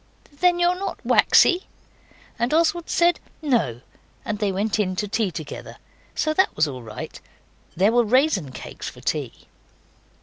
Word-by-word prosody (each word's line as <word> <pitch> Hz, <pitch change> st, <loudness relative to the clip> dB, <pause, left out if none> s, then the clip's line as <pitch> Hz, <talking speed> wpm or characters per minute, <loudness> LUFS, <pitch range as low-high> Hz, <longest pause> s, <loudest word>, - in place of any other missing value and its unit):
'Then 360 Hz, 0 st, +4 dB
you're 350 Hz, +1 st, +2 dB
not 395 Hz, -, -4 dB
waxy?' 360 Hz, +2 st, +4 dB, 0.7 s
And 240 Hz, +6 st, +1 dB
Oswald 335 Hz, +1 st, +1 dB
said 345 Hz, +1 st, +3 dB, 0.2 s
'No' 225 Hz, -, 0 dB, 0.4 s
and 210 Hz, -, -3 dB
they 205 Hz, -2 st, +1 dB
went 205 Hz, +3 st, -1 dB
in 185 Hz, -3 st, 0 dB
to 210 Hz, -, -2 dB
tea 210 Hz, 0 st, 0 dB
together. 155 Hz, -4 st, -8 dB, 0.4 s
So 310 Hz, -, 0 dB
that 380 Hz, +4 st, +2 dB
was 155 Hz, 0 st, +2 dB
all 130 Hz, -3 st, -6 dB
right. 110 Hz, -2 st, -8 dB, 0.5 s
There 195 Hz, +5 st, +3 dB
were 240 Hz, +1 st, +4 dB
raisin 230 Hz, -, +2 dB
cakes -, -, -7 dB
for -, -, -14 dB
tea. -, -, -3 dB
225 Hz, 155 wpm, -23 LUFS, -, 0.7 s, Then